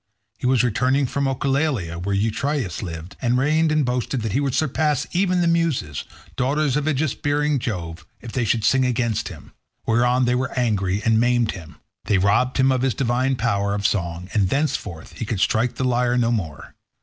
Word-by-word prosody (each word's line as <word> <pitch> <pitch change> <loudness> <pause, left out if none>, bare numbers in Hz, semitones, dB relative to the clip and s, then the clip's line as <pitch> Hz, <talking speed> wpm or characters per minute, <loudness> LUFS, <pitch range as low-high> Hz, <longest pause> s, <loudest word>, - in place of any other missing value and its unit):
He 125 - -1
was 125 -2 +3
returning 130 +4 +2
from 140 +2 -1
Oechalia, 135 - -1
where 100 +3 -1
Eurytus 115 - -1
lived 85 -2 -7
and 125 0 +2
reigned, 155 +4 +2
and 155 -2 +2
boasted 125 -1 -2
that 110 - -2
he 135 - +1
would 140 -3 -1
surpass 150 -1 +1
even 180 0 +1
the 170 - +2
Muses, 165 - 0 0.3
daughters 140 +1 +1
of 150 0 0
aegis 155 -2 +1
bearing 145 0 0
Jove, 85 -8 -5 0.2
if 120 - -9
they 125 - -1
should 115 0 0
sing 130 +4 +3
against 120 -4 0
him; - - -11 0.3
whereon 125 +2 +2
they 125 - +2
were 125 +1 -2
angry, 100 -5 0
and 110 -1 +4
maimed 120 -1 +2
him. 85 -5 -10 0.3
They 105 - +2
robbed 100 +7 +2
him 130 0 +4
of 130 -1 +1
his 130 -2 +1
divine 130 +1 +1
power 100 -4 0
of 100 0 -3
song, 90 -4 -1
and 100 -4 +2
thenceforth 130 - -2
he - - -2
could 105 -2 -3
strike 115 +4 +1
the 130 - -2
lyre 125 0 +1
no 120 -1 +2
more. 85 -10 -4
125 Hz, 195 wpm, -22 LUFS, 105-135 Hz, 0.3 s, and